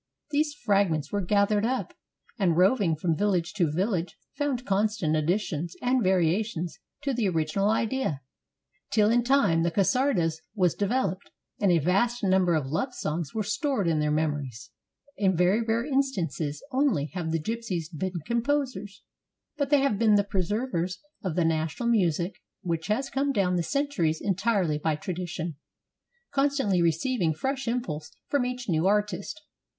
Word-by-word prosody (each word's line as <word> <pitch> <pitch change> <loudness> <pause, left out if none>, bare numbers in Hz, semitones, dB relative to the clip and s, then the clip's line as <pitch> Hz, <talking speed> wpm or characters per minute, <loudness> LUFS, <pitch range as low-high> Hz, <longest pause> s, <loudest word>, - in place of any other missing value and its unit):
These 295 0 +1
fragments 195 - +1
they 205 - 0
gathered 205 +2 +2
up, 255 +3 -1 0.5
and 175 -5 +2
roving 185 -2 +3
from 160 +1 0
village 185 -2 0
to 175 -8 +1
village 180 +1 -1 0.2
found 275 -4 -1
constant 200 -6 +1
additions 170 0 -1
and 250 0 +1
variations 180 0 0 0.2
to 280 -2 0
the 230 -5 +1
original 165 +4 0
idea, 225 - 0 0.7
till 210 0 +3
in 240 +1 +3
time 250 -11 +3
the 170 - +2
csardas 190 - +1 0.2
was 180 -5 +3
developed 200 -3 -1 0.3
and 200 -3 +3
a 170 - +5
vast 205 - +1
number 185 -3 +3
of 155 -4 0
love 160 - -2
songs 155 +1 -3
were 220 - 0
stored 220 - 0
in 160 -2 +2
their 150 0 +1
mem 155 +1 +2
ories. 130 -5 -7 0.5
In 190 -4 +2
very 180 +6 +3
rare 230 +1 0
instances 230 - -1
only 245 - +1
have 165 -3 -3
the 165 - +1
gypsies 185 -4 -4
been 180 +1 -3
composers, 235 -5 -1 0.5
but 285 -2 -1
they 290 -1 +5
have 245 -8 +1
been 220 -2 +5
the 200 - +4
preservers 195 -1 -1 0.3
of 180 -5 -2
the 175 - +2
national 165 +7 -1
music 180 -4 +1 0.2
which 165 -3 -2
has 265 +6 -1
come 275 +1 +1
down 190 -7 +1
the 175 - +1
centuries 225 - 0
en 200 - 0
tirely 190 -6 +1
by 155 0 0
tradition, 175 -1 -4 0.8
constantly 275 -10 +2
receiving 170 - +1
fresh 270 - -2
impulse 200 -11 -2 0.2
from 275 -4 +1
each 250 -1 -5
new 165 -1 +2
artist. 205 - 0
195 Hz, 155 wpm, -27 LUFS, 165-235 Hz, 0.8 s, a